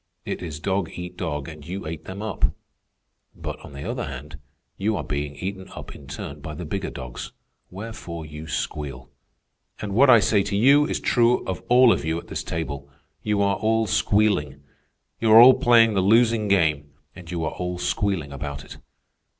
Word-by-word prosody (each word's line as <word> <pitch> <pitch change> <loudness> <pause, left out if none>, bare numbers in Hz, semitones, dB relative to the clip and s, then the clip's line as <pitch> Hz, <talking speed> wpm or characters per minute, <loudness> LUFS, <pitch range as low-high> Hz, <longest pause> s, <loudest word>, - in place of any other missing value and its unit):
It - - -4
is 80 -4 -6
dog 95 0 -1
eat 90 0 -7
dog, 75 -5 -4
and 75 -2 -10
you 90 +5 -6
ate 80 0 -6
them 100 +3 -7
up. 110 - 0 0.9
But, - - -6
on - - -12
the 70 - -7
other - - -3
hand, 70 +2 -8 0.4
you 105 +1 -1
are 80 - -3
being 70 +2 -3
eaten 95 +2 -6
up - - -8
in 70 - -13
turn 75 0 -7
by 75 +1 -7
the 90 - -6
bigger 95 +5 -3
dogs, 65 -2 -8 0.4
wherefore 90 -5 -7
you 75 +1 -9
squeal. 70 -4 -4 0.7
And 105 -2 -4
what 130 +6 +5
I 120 -3 +9
say 105 -1 +3
to 100 +1 -2
you 140 +7 +5
is - - -2
true 120 0 +2
of 95 - -4
all 125 -1 +7
of - - -3
you 80 +1 -1
at - - -9
this - - -4
table. 70 -4 -5 0.3
You 105 -1 +1
are 100 0 +1
all 110 +1 +1
squealing. 100 -11 +1 0.6
You 115 -1 +2
are 110 - +11
all 125 +2 +10
playing 115 -2 +5
the 95 - +2
losing 110 +2 +3
game, 80 -7 +1 0.2
and - - -11
you 85 -2 -3
are 80 - -2
all 90 0 -4
squealing 90 -5 -1
about 70 0 -6
it. - - -11
90 Hz, 190 wpm, -24 LUFS, 75-105 Hz, 0.9 s, are